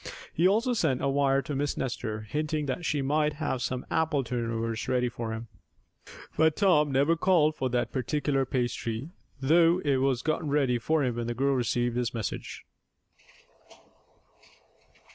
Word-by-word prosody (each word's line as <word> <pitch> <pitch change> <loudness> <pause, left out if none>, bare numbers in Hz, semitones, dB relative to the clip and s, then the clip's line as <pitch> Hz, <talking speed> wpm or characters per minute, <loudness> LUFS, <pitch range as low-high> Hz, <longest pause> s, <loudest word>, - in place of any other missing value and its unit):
He 170 +3 +3
also 230 +6 +2
sent 160 - 0
a - - +2
wire 135 0 +2
to 150 - -5
Miss 145 +1 -1
Nestor, 115 -4 -3
hinting 150 +6 -2
that 140 +6 -3
she 145 -4 0
might 150 +2 +1
have 140 -4 -3
some 130 0 -3
apple 155 -4 +1
turnovers 115 -2 -3
ready 125 -1 +1
for 115 -1 -5
him. 115 +1 -5 0.9
But 160 0 +3
Tom 150 -8 +3
never 140 +5 +3
called 165 -3 +3
for 130 -3 -2
that 120 0 -1
particular 135 +1 0
pastry, 120 0 -2 0.3
though 165 +5 +4
it 140 -2 +3
was 130 -2 +1
gotten 155 -1 -1
ready 135 -4 +2
for 155 +5 +1
him 125 -3 -1
when 120 -1 -2
the 120 - -3
girl 135 +3 +1
received 120 -1 0
his 125 0 -1
message. 110 -5 -5
135 Hz, 160 wpm, -28 LUFS, 120-150 Hz, 0.9 s, though